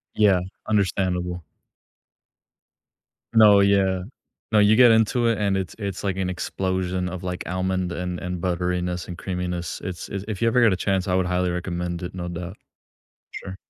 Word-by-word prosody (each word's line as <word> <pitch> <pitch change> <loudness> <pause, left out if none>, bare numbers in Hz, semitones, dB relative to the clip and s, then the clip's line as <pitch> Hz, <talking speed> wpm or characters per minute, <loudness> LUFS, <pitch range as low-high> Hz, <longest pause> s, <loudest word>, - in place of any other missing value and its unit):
Yeah. 100 -4 +4 0.3
Understandable. 90 -4 0 1.9
No. 105 -3 +7
Yeah. 95 -2 +3 0.5
No, 105 - +5
you 105 +1 +5
get 120 0 +7
into 115 +2 +3
it, 115 - +2
and 100 -2 +1
it's 95 -4 -4
it's 100 -3 -5
like 95 -2 -1
an 95 -1 -1
explosion 95 0 -2
of, 90 0 -7
like, 90 0 -4
almond 95 0 -1
and 90 0 -4
and 90 -2 -4
butteriness 90 0 -1
and 90 -1 -7
creaminess. 90 -2 -4
It's 95 -3 -5
it's 100 0 -5
if 105 -2 -5
you 115 - +3
ever 125 +2 +3
get 115 -4 +5
a - - +2
chance, 95 0 -1
I 90 - +1
would 95 - +2
highly 90 0 0
recommend 90 0 -3
it, 90 - -5
no 90 -1 -5
doubt. 90 +2 -6 0.7
Sure. 95 -1 -7
95 Hz, 170 wpm, -24 LUFS, 90-100 Hz, 1.9 s, No